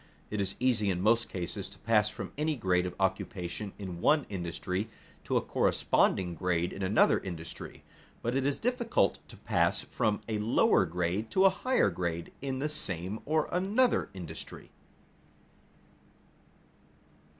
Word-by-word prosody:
It 105 -1 -1
is 95 -1 -1
easy 120 -5 +2
in 90 -2 0
most 115 +4 +3
cases 90 -3 -4
to - - -15
pass 105 -1 +3
from - - -7
any 155 +1 0
grade 90 -6 +1
of 90 - -6
occupation 95 +1 -2
in 90 -4 -6
one 150 - +4
industry 90 +2 -3 0.4
to - - +1
a - - +2
corresponding 90 -2 +2
grade 85 0 0
in 100 - -7
another 95 +3 +4
industry; 85 -3 -7 0.4
but 120 +2 0
it 135 - +1
is 140 +1 0
difficult 240 - +1
to - - -13
pass - - +1
from 105 -2 0
a 110 -2 -1
lower 110 +3 +3
grade 90 +6 -1
to 190 +10 +4
a 195 - +7
higher 250 - +2
grade 85 -1 -3
in 135 -1 -2
the 140 +3 -1
same 95 - -2
or 155 0 +2
another 205 +8 +2
industry. 85 -3 -8
105 Hz, 150 wpm, -30 LUFS, 90-135 Hz, 0.4 s, a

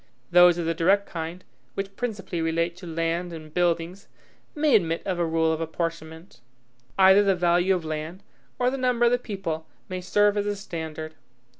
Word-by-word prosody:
Those 175 0 +7
of 170 - -2
the 165 - +1
direct 195 +5 +2
kind, 165 +2 -6 0.3
which 195 0 -4
principally 205 -8 -4
relate 165 +1 0
to 180 -1 -10
land 165 +2 -2
and 155 -2 -10
buildings, 175 +2 -1 0.5
may 295 -4 +3
admit 165 -5 +1
of 185 -3 -2
a 170 - +2
rule 160 0 +1
of 160 - -3
apportionment. 165 0 -5 0.6
Either 190 +1 +7
the 195 -2 +3
value 175 +2 +2
of 175 -3 -4
land, 155 +4 -5 0.3
or 250 0 +1
the 270 - -3
number 250 -2 +2
of 235 - +4
the 245 - +2
people, 190 -9 -5 0.2
may 185 0 -4
serve 205 +3 +2
as 205 0 0
a 205 - -1
standard. 160 -5 -6
175 Hz, 180 wpm, -25 LUFS, 165-195 Hz, 0.6 s, Those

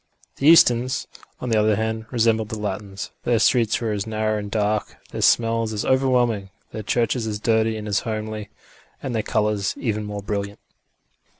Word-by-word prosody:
The 140 - +1
Easterns, 130 -6 +5 0.3
on 125 - -4
the 110 -2 +3
other 105 0 +3
hand, 110 +1 -2
resembled 110 -3 +1
the 110 - -4
Latins; 100 -1 -5
their 120 -1 +2
streets 115 0 +3
were 115 -2 -2
as 105 0 -3
narrow 110 -1 -1
and 105 0 -6
dark, 105 0 -1
their - - -4
smells 115 -1 +2
as 105 - -2
overwhelming, 125 -6 +2 0.2
their 110 - -5
churches 115 +2 0
as 105 -1 -3
dirty 110 0 +1
and 105 0 -6
as 105 -1 +1
homely, 110 -1 -4 0.5
and 130 - -3
their 110 - +1
colours 105 -2 0
even 110 -3 -2
more 105 -1 -6
brilliant. 100 0 -3
110 Hz, 175 wpm, -23 LUFS, 105-115 Hz, 0.5 s, Easterns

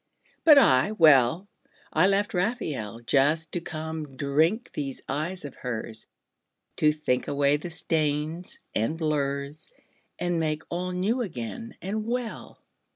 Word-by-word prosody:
But 305 -3 +8
I, 205 - +5
well, 160 - +5 0.5
I 160 +4 +5
left 200 +1 +1
Raphael 160 - -2
Just 145 +7 +2
to 175 - -2
come 155 -4 -6
drink 160 - +1
these 140 -3 -3
eyes 155 +5 -3
of 140 - -7
hers, 110 -2 -5 0.7
To 150 - +4
think 150 -5 -1
away 140 0 +2
the 165 +4 -7
stains 160 0 -1 0.2
and 115 +9 0
blurs 145 - -2 0.5
And 175 -1 0
make 155 -1 -1
all 180 +1 -2
new 200 +8 0
again 195 - -5
and 210 +3 -2
well. 235 0 -4
155 Hz, 130 wpm, -27 LUFS, 140-185 Hz, 0.7 s, But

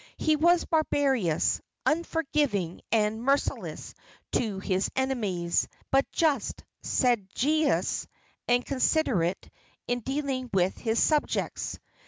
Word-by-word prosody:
He 310 -1 +2
was 345 +3 +3
barbarous, 270 - +1 0.2
unforgiving 300 - 0
and 220 0 +1
merciless 275 +3 -1 0.4
to 215 -5 0
his 190 0 0
enemies, 210 -11 0 0.2
but 270 +1 +2
just, 295 -8 0 0.2
sagacious 255 +6 +1 0.4
and 245 0 +2
considerate 255 - +1 0.4
in 245 0 0
dealing 265 0 -3
with 185 -1 +2
his 225 -1 -1
subjects. 300 +3 0
255 Hz, 95 wpm, -28 LUFS, 205-295 Hz, 0.4 s, was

